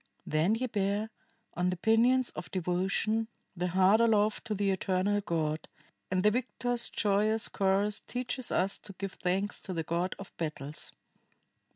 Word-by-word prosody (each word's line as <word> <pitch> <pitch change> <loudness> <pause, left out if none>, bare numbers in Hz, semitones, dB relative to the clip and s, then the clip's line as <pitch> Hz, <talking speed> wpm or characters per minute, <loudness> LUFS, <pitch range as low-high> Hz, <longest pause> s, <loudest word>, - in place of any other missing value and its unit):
Then 160 +8 +2
ye 250 +3 -1
bear, 205 -1 -1 0.4
on 180 +1 +1
the 180 - -2
pinions 235 +5 +3
of - - -7
devotion, 190 +5 0 0.3
the 180 0 -1
heart 190 +5 +4
aloft 215 -2 +3
to 215 -2 -2
the 200 0 +1
eternal 190 +2 +1
God, 160 -4 -1 0.4
and 185 0 +1
the 210 - +5
victors' 245 0 -1
joyous 215 +1 +2
chorus 200 +1 +1
teaches 250 0 -3
us 190 +2 +1
to 195 - -8
give 195 +1 -5
thanks 190 +3 -1
to 185 - -6
the 165 -2 -2
God 170 +4 -1
of 195 - -10
Battles." 150 -2 -4
195 Hz, 155 wpm, -31 LUFS, 180-220 Hz, 0.4 s, the